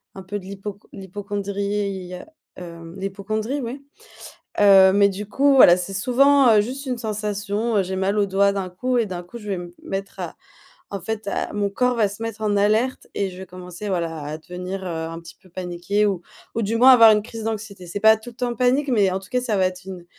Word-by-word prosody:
un 190 - -8
peu 205 +3 -4
de 185 - -13
l'hypoc 200 +1 -7
l'hypocondrie, 200 -1 -4
heu, 180 - -9 0.3
hem, 170 -1 -10
l'hypocondrie, 215 +7 -3
oui, 265 +4 -6 0.8
heu, 195 -2 +7
mais 200 0 +5
du 200 +1 -5
coup, 275 +6 +3
voilà, 180 -9 +8
c'est 195 +2 -5
souvent, 260 +4 +4
heu, 210 - +6
juste 260 +6 -4
une 250 -2 -3
sensation, 210 0 -2
heu, - - +3
j'ai 190 +1 -4
mal 195 +2 0
au 200 - +3
doigt 200 +1 +3
d'un 195 -2 -3
coup 245 +8 -1
et 225 - +1
d'un 180 -2 -5
coup, 205 +7 -10
je 210 -2 -10
vais 195 - -1
me 175 0 -7
p 175 - -18
mettre 195 +1 -5
à - - -6 0.5
en 200 -2 -4
fait 220 +2 -4
à - - -2
mon 205 -1 0
corps 250 +3 +1
va 210 -3 +3
se 210 +3 -9
mettre 225 -1 -5
en 205 -1 +1
alerte 215 +6 +1
et 195 -2 -1
je 180 - -11
vais 190 - -8
commencer 180 +2 -8
voilà, 165 -4 -2
à 150 +2 -5
devenir, 180 +3 -6
heu, - - -5 0.2
un 165 0 -7
petit 165 0 -13
peu 185 - -21
paniquée 180 +4 -1
ou 190 -4 -1 0.3
ou 230 - -1
du 220 +3 0
moins 255 +3 +7
avoir 230 -3 +9
une 210 -1 +3
crise 225 0 -8
d'anxiété. 210 -4 -5
C'est 205 - -4
pas 220 0 +7
tout 240 +2 -10
temps 245 0 -2
en - - -6
panique, 260 +4 +2
mais 205 -6 +3
en 190 - -1
tout 190 - -15
cas, 250 - +1
ça 230 -5 -1
va 185 -1 +3
être 185 0 -5
une 180 -2 -8
200 Hz, 240 wpm, -22 LUFS, 185-225 Hz, 0.8 s, avoir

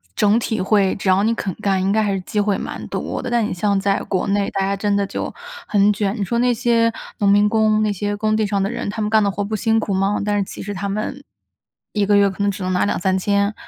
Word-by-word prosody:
整 210 +2 +3
体 220 -3 -2
会 195 0 +2
只 195 - -2
要 190 +2 +4
你 230 +2 +1
肯 195 -4 -3
干， 195 -2 +1
应 190 +1 +1
该 220 +2 +2
还 205 -2 0
是 190 - -2
机 210 +3 -3
会 205 -1 +1
蛮 - - -6
多 - - -4
的。 255 - -4
但 240 -2 +1
你 - - -3
像 200 +2 0
在 195 0 +1
国 190 - -1
内 200 0 +1
大 195 - -1
家 195 +1 0
真 205 0 0
的 200 0 +1
就 195 - -4 0.4
很 205 0 +3
卷， 205 0 -1
你 205 - -1
说 235 +5 -1
那 245 0 +3
些 230 0 +2 0.3
农 200 - +2
民 205 +1 +4
工， 215 -1 +2
那 210 - +1
些 205 +1 -2
工 215 +1 0
地 215 -1 +1
上 200 -1 0
的 195 - -1
人， 240 - -4
他 215 +2 -4
们 210 - 0
干 220 0 +4
的 200 - +2
活 200 +1 -2
不 215 +2 -3
辛 225 +2 +1
苦 215 -2 -1
吗？ 195 +2 0
但 205 0 +1
是 200 - +1
其 - - -9
实 205 - -5
他 200 +1 -4
们 215 +7 -3 0.7
1 210 -2 0
个 205 +1 +3
月 200 0 +5
可 190 +1 -7
能 200 - +2
只 195 -1 -4
能 185 - -1
拿 180 - +1
2-3 190 -1 0
千， 200 +2 +1
205 Hz, 295 characters per minute, -20 LUFS, 195-215 Hz, 0.7 s, 月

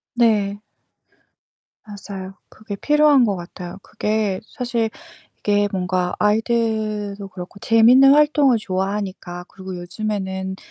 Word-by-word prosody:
네. 210 -4 +2 1.2
맞아요. 200 -3 -8 0.2
그게 215 -2 -8
필요한 295 +2 +4
것 205 -3 0
같아요. 175 0 -8
그게 210 -3 -1
사실 235 -2 -2 0.5
이게 205 0 +2
뭔가 185 -2 -1
아이들도 215 -2 0
그렇고 185 +1 -10
재밌는 245 +6 +6
활동을 295 -4 +4
좋아하니까 190 -2 -4
그리고 190 -1 -9
요즘에는 190 0 -4
205 Hz, 260 characters per minute, -21 LUFS, 190-225 Hz, 1.2 s, 재밌는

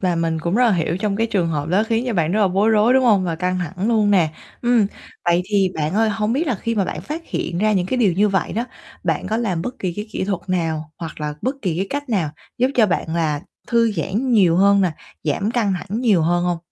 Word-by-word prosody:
Và 180 -3 +1
mình 165 -1 0
cũng 170 +3 -1
rất 250 +3 +4
là 225 - +4
hiểu 170 -1 0
trong 200 0 -1
cái 225 +1 +1
trường 195 -7 0
hợp 150 -1 -2
đó 190 +5 +3
khiến 230 +1 0
cho 240 - -1
bạn 165 -2 +1
rất 215 - +2
là 200 - +4
bối 195 +4 +2
rối, 220 +3 +4
đúng 260 -1 +4
hông? 205 -5 +4
Và 170 -2 -1
căng 180 +2 -1
thẳng 185 +5 -3
luôn 215 -3 +3
nè. 175 -6 +3 0.3
Ừm, 240 -4 +3 0.4
vậy 175 +1 +3
thì 195 -1 +2
bạn 155 +2 -2
ơi, 220 +1 +3
hông 215 +1 -1
biết 300 +7 0
là 260 - +1
khi 230 +3 -3
mà 200 -3 +1
bạn - - -4
phát 315 +3 -6
hiện 170 - -3
ra 215 +2 +2
những 185 -3 +1
cái 255 - -1
điều 210 -7 +3
như 205 +5 +3
vậy 195 -2 0
đó, 230 +3 -1 0.4
bạn 165 +1 -1
có 215 +3 -1
làm 195 -8 -1
bất 250 +6 -5
kỳ 185 -2 -2
cái 210 +1 -4
kỹ 195 - -2
thuật 195 -2 -2
nào 160 -4 -2
hoặc 165 -2 -7
là 150 0 -3
bất 260 +2 -1
kỳ 180 -6 -1
cái 190 +3 -1
cách 285 0 -3
nào 185 -10 0 0.3
giúp 255 +2 +3
cho 225 -3 +5
bạn 165 -3 -1
là 155 -3 0 0.3
thư 230 -2 +2
giãn 205 - -1
nhiều 185 -7 +4
hơn 200 +1 +5
nè, 185 -4 +2 0.3
giảm 195 +8 0
căng 230 -5 +1
thẳng 210 +6 -4
nhiều 210 -10 +3
hơn 175 +2 +1
hông? 175 -1 0
195 Hz, 275 wpm, -20 LUFS, 170-225 Hz, 0.4 s, cho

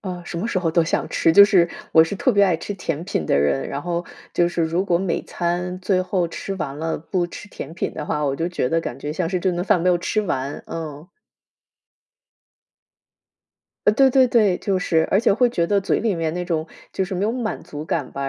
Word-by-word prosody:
啊， 180 -3 -6
什 170 - -5
么 200 - -2
时 195 - 0
候 165 -3 0
都 165 0 +3
想 - - -1
吃。 165 - +2
就 200 +3 +10
是 185 -4 +4 0.2
我 160 0 +7
是 165 - -4
特 245 +5 +1
别 200 -1 +5
爱 180 -4 +2
吃 205 +5 -6
甜 165 -3 -4
品 80 - -2
的 - - +2
人， 70 -1 +1
然 140 - -4
后 175 0 -2 0.3
就 175 0 +2
是 175 -1 -1
如 170 +4 0
果 170 -3 +2
每 190 -2 -1
餐 180 +1 -2
最 185 0 +1
后 185 -2 -1
吃 195 +3 -5
完 145 -4 -4
了， 160 +1 -2
不 175 +3 -2
吃 205 +4 -10
甜 160 -3 -8
品 - - -3
的 150 - -5
话， 150 0 -1
我 140 -1 0
就 165 +1 -1
觉 175 -8 -1
得 165 0 +1
感 130 -4 -6
觉 145 +2 -4
像 165 0 -2
是 185 0 -1
这 185 - +1
顿 175 +1 -2
饭 185 -3 +3
没 180 - +1
有 175 -1 +3
吃 215 +5 0
完， 140 -6 -3
嗯。 155 0 -7 2.8
呃， 210 - +6
对 265 +3 +5
对 260 0 +5
对， 215 -7 +3
就 190 -2 -1
是 160 -2 +2
而 195 - +5
且 230 - +3
会 245 +4 +3
觉 175 -8 0
得 200 +3 +2
嘴 195 - 0
里 215 -4 0
面 165 0 -2
那 180 0 -3
种， 160 -2 -2 0.3
就 190 - -1
是 190 - -5
没 185 +3 -1
有 220 - +1
满 235 -3 -3
足 150 +1 -7
感 160 -3 -2
吧， 140 0 -3
175 Hz, 260 characters per minute, -22 LUFS, 160-195 Hz, 2.8 s, 就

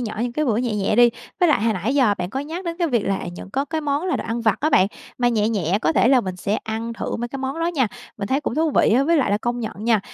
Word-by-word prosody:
nhỏ 225 -3 -4
những 240 -1 -2
cái 305 +3 0
bữa 225 -5 +1
nhẹ 235 -3 -1
nhẹ 205 +1 0
đi. 240 -1 +7 0.3
Với 355 - +5
lại 290 - +3
hồi 225 -1 +2
nãy 210 +8 -2
giờ 250 -7 +4
bạn 180 +1 -3
có 265 - -2
nhắc 325 +6 -6
đến 335 -1 -3
cái 340 -2 +1
việc 240 -6 +1
là, 195 0 0
à, - - -6
những 190 - -9
có 270 +6 -1
cái 315 +1 -3
món 295 +4 -1
là 360 - +1
đồ - - -5
ăn 230 +1 -2
vặt 220 -4 +2
á 310 +2 +1
bạn, 185 - +5 0.3
mà 245 - +3
nhẹ 220 -2 +1
nhẹ, 195 -3 0
có - - +2
thể 240 - +3
là 265 -2 +5
mình 185 -3 -5
sẽ 200 +3 -1
ăn 225 +1 -3
thử - - -4
mấy 240 +1 -4
cái 275 - -6
món 270 +5 -3
đó 330 - +1
nha, 295 -9 +1 0.3
mình 200 -1 -4
thấy 270 +2 +1
cũng 275 - -3
thú 315 +1 +1
vị 220 - +3
á. 260 - +4
Với 335 +3 +3
lại 275 -8 +2
là 205 - +2
công 240 +2 -2
nhận 215 -1 -6
nha, 225 -3 +3
240 Hz, 335 wpm, -22 LUFS, 215-285 Hz, 0.3 s, đi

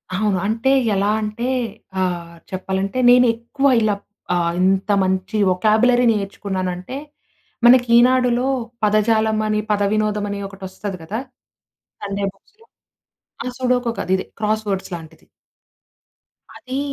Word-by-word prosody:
అవును. 205 -1 +1
అంటే 230 +5 0 0.3
ఎలా 200 +1 +1
అంటే 215 +2 -4 0.6
ఆహ్, 175 -2 -2 0.2
చెప్పాలంటే 190 +4 -3
నేను 250 0 +7
ఎక్కువ 270 +4 -1
ఇలా 210 -2 +2 0.6
ఇంత 190 +2 +2
మంచి 190 +3 -1
వొకాబ్యులరీ 220 +6 +3
నేర్చుకున్నానంటే, 190 0 -3 0.7
మనకి 245 0 +6
ఈనాడులో 250 0 +3 0.4
పదజాలం 215 +1 +2
అని 215 0 +1
పదవినోదం 210 0 +1
అని 200 - -4
ఒకటొస్తది 195 0 -7
కదా! 210 +8 -4 0.8
సండే 200 0 -3
బుక్స్‌లో. 445 +3 -27 0.8
అహా! 250 - -4
సుడోకు 250 -2 +1
కాదిది 190 +1 0
క్రాస్‌వర్డ్స్ 210 -2 -1
లాంటిది. 160 -1 -12 1.3
అది 260 +2 -5
210 Hz, 105 wpm, -20 LUFS, 190-235 Hz, 1.3 s, నేను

